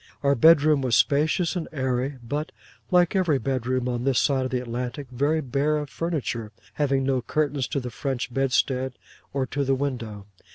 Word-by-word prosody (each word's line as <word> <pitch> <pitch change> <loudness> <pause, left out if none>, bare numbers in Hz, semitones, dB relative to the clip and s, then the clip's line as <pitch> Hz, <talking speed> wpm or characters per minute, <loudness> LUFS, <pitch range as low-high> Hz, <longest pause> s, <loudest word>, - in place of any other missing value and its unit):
Our 140 0 +4
bedroom 150 +1 +5
was 125 -3 +2
spacious 155 +5 +2
and 170 -3 -3
airy, 130 -1 -1
but 145 +6 -3 0.4
(like 180 0 +3
every 175 -7 +3
bedroom 130 -1 -1
on 120 -1 -2
this 135 -2 +2
side 135 -3 +2
of - - -2
the 125 - -1
Atlantic) 125 +3 -4
very 145 +5 +1
bare 140 +3 0
of 150 -2 -5
furniture, 135 -10 -3 0.2
having 140 -2 +1
no 130 -1 +1
curtains 145 -1 -1
to 110 - -1
the 125 -2 -6
French 130 0 -3
bedstead 130 0 +1 0.4
or 135 -1 -1
to 140 +2 -2
the 135 0 +2
window. 120 -7 -4
135 Hz, 175 wpm, -25 LUFS, 125-150 Hz, 0.4 s, bedroom